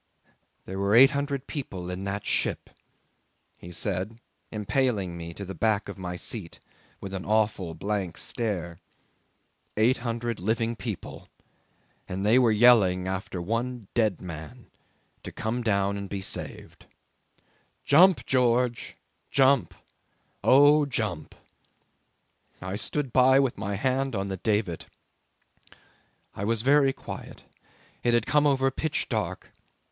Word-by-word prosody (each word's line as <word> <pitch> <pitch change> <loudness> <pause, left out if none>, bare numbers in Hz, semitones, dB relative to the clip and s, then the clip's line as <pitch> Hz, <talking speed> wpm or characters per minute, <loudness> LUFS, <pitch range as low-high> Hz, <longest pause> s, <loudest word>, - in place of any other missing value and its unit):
"There 95 +1 -5
were 100 +2 +2
eight 135 +3 +8
hundred 140 -1 -2
people 95 - -6
in 95 +2 -5
that 100 +1 -3
ship," - - -1 0.8
he 85 - -11
said, 95 +4 -3 0.3
impaling 105 -4 0
me 85 0 -7
to 100 - -6
the 95 - -6
back 110 -1 0
of 100 -1 -8
my 90 -1 -4
seat 95 -3 -7 0.4
with 95 0 -7
an 95 -1 -4
awful 105 -5 0
blank 95 0 -3
stare. 90 -8 -3 1.0
"Eight 120 +5 +4
hundred 120 -1 -3
living 115 +4 0
people, 110 -5 -7 0.8
and 95 +2 -3
they 115 +5 +5
were 120 -3 +4
yelling 105 -5 +5
after 95 0 -4
the - - -3
one 115 +2 -3
dead 110 -5 +1
man 80 -4 -9 0.5
to - - -8
come 115 +3 -3
down 100 -3 +1
and 100 -1 -6
be 100 - -3
saved. 95 - -7 1.0
'Jump, 180 +5 +5
George! 125 -1 +1 0.3
Jump! 135 -1 +3 0.7
Oh, 145 +2 +6
jump!' 105 - -3 1.2
I 95 +1 -5
stood 135 +4 -3
by 130 +1 +6
with 135 -3 +1
my 100 +1 -2
hand 130 +3 0
on 100 0 -2
the 95 - -3
davit. 105 -4 -1 1.5
I 100 - -6
was 110 +1 0
very 140 0 +4
quiet. - - -9 0.6
It 120 -1 +2
had 120 - +1
come 145 +2 +3
over 135 -1 +2
pitch 155 +3 -2
dark. - - -3
110 Hz, 130 wpm, -27 LUFS, 95-125 Hz, 1.5 s, eight